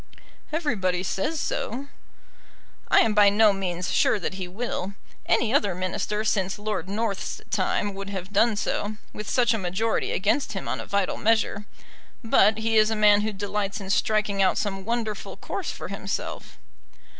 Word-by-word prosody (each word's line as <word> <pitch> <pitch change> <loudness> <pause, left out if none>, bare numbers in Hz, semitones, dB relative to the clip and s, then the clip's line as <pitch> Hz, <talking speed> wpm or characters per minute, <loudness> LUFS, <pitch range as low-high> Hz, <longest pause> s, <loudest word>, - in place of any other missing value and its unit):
"Everybody 200 - 0
says 245 - -1
so." 265 +2 -3 1.0
"I - - +6
am 225 - +2
by 205 -1 +6
no 210 0 +5
means 185 -2 -3
sure - - +3
that 190 - -3
he 190 -1 -5
will. 200 -1 -4 0.3
Any 235 0 +2
other 205 -10 +2
Minister 185 +3 -2
since 195 -3 0
Lord 205 -3 -3
North's 205 -1 -2
time 205 -1 0
would 195 0 -6
have 190 0 -6
done 225 +2 +4
so, 210 +1 -2 0.2
with 210 - -6
such 240 -2 +3
a 225 - -1
majority 195 +5 -1
against 215 +5 +1
him 195 - -5
on - - -2
a - - -7
vital 200 -2 0
measure; 220 -2 +1 0.6
but 220 -1 +4
he 225 0 +1
is 215 0 +5
a 220 - 0
man 210 -1 +5
who 215 +1 -1
delights 205 0 -3
in 195 -1 -4
striking 210 -1 +1
out 190 -1 +3
some 195 -2 -2
wonderful 225 -3 -3
course - - -4
for - - -6
himself." - - -5
205 Hz, 170 wpm, -25 LUFS, 195-220 Hz, 1.0 s, I